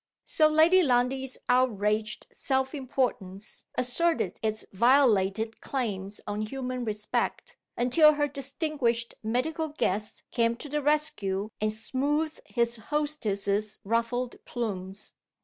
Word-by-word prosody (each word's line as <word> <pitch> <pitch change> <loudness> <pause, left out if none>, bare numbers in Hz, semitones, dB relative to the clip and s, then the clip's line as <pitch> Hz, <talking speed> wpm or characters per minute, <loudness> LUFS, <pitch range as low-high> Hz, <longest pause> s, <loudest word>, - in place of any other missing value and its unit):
So 310 - +4
Lady 320 +4 +5
Lundie's 260 -2 +1
outraged 215 -4 +1
self 265 -1 0
importance 240 -8 -3
asserted 255 - +1
its 215 0 -2
violated 225 -2 +3
claims 205 -6 -3
on 205 0 -3
human 255 +2 -3
respect, 210 -2 -2 0.2
until 305 +6 +6
her 290 0 +1
distinguished 275 -4 -1
medical 280 +9 -1
guest 210 -8 -2
came 230 -1 +2
to 270 - -7
the 295 +1 -1
rescue 215 -9 0
and 215 0 +2
smoothed 285 +8 -1
his 235 -1 0
hostess's 215 -7 -1
ruffled 230 +3 -1
plumes. 200 -4 -5
245 Hz, 110 wpm, -28 LUFS, 215-280 Hz, 0.2 s, until